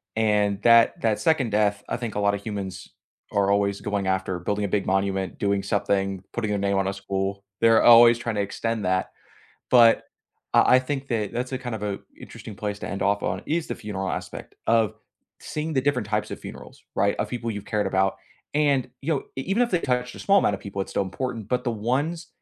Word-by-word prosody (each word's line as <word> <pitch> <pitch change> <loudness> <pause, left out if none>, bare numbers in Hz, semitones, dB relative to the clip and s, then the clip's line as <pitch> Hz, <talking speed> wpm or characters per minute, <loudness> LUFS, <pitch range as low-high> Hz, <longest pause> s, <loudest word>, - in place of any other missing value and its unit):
and 105 -2 +1
that 115 0 +6
that 110 -2 +1
2nd 160 -9 +1
death, 105 -1 +1
I - - -1
think 120 -3 -5
a - - 0
lotta 100 0 +2
humans 100 -2 -6 0.4
are 100 0 +2
always 100 0 +1
going 100 -2 -2
after 95 -1 -1
building 100 +4 -1
a - - -1
big 100 +1 0
monument, 95 0 -1
doing 100 -1 0
something, 100 -1 -1
putting 115 -3 -2
their 105 -1 0
name 100 0 +1
on 95 0 +1
a 100 - -1
school, 100 0 -3 0.2
they're 115 0 +5
always 120 0 +8
tryna 115 -2 -3
extend 110 +2 -2
that. 95 0 0 0.6
But 120 -2 +6 0.5
I- - - +6
I - - +6
think 135 +1 -4
that 110 -4 -1
that's 125 +2 -3
a 130 - -1
kind 125 -2 -5
of 110 - -6
a 100 -1 -2 0.2
interesting 110 - -10
place 105 0 -4
to - - -5
end 100 - -3
off 100 +1 +1
on, - - -2
is 160 +1 -1
the - - -3
funeral 95 -3 -4
aspect - - -6
of 115 -2 +3 0.5
seeing 155 +1 -4
the 135 - +2
different 130 -5 0
types 105 0 -1
of - - -5
funerals, - - -11
right? 100 +1 +2
Of - - -1
people 120 -2 -3
you've 105 -2 -5
cared 105 -1 -1
about. 95 0 +1 0.4
And, 145 -4 +2
you 160 +3 +1
know, 140 - -2
e 135 - -2
even 195 - +1
if 240 - 0
they 180 - +2
touched 125 -2 -1
a - - -10
small 200 0 +4
amount 100 - +2
of 95 - -6
people, 100 -1 -6
it's - - -9
still - - +1
important. 110 +3 -5
But 125 0 -1
the 120 - 0
ones 140 +10 -2
105 Hz, 220 wpm, -25 LUFS, 100-125 Hz, 0.6 s, always